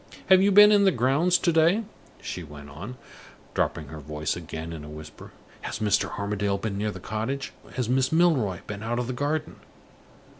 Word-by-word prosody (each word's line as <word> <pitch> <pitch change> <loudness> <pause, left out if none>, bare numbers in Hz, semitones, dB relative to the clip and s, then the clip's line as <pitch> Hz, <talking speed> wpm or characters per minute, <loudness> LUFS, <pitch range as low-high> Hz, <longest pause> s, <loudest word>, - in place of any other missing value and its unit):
Have 190 0 +7
you 200 +1 +4
been 210 +2 +9
in 205 -1 +5
the 195 - +6
grounds 140 +8 +2
to 170 - +1
day?" 170 +7 +4 0.4
she 90 - -5
went 75 -3 -11
on, 100 - -8 0.6
dropping 75 -3 -1
her 80 +1 -8
voice 75 +1 -3
again 80 -1 -6
in 80 -2 -8
a 75 - -9
whisper. 75 0 -11 0.3
"Has - - -4
Mr. 105 -2 0
Armadale 100 -1 -1
been 100 0 -3
near 105 +2 -1
the - - -7
cottage? 130 +6 -4 0.2
Has 125 -3 -1
Miss 130 +1 +1
Milroy 150 - +2
been 100 0 -6
out 115 +2 -2
of 125 - -1
the 130 - -4
garden? 145 +4 -2
110 Hz, 190 wpm, -26 LUFS, -, 0.6 s, been